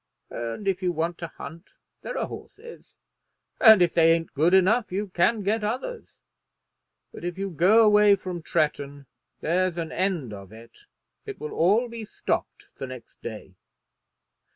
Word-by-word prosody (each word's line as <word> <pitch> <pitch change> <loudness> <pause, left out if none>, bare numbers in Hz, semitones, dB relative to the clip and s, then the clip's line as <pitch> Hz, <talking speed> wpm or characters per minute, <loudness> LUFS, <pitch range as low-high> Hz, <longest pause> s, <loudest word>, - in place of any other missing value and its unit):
And 115 - -5
if 190 -1 0
you 180 -1 +1
want 170 +1 -2
to 170 - -4
hunt 165 +2 -12 0.2
there - - -5
are - - -1
horses, 470 +2 -12 0.6
and 220 -6 +8
if 170 - +1
they 165 -1 +5
ain't 165 -1 -3
good 160 +5 +2
enough 210 +5 +3
you 200 +2 -3
can 200 +5 +1
get 215 +3 0
others. 260 - -4 1.0
But - - -10
if 175 0 -4
you 195 0 -3
go 195 +8 +5
away 210 -1 +6
from 180 -3 -6
Tretton 145 -3 -2 0.4
there's 180 +1 0
an 165 -2 -4
end 175 - -2
of 100 -1 -10
it. 115 +1 -15 0.4
It - - -7
will 150 - -6
all 205 +9 +3
be 230 -1 -7
stopped 210 - -4
the 135 - -5
next 130 -2 -12
day." 105 -4 -8
180 Hz, 160 wpm, -25 LUFS, 155-210 Hz, 1.0 s, and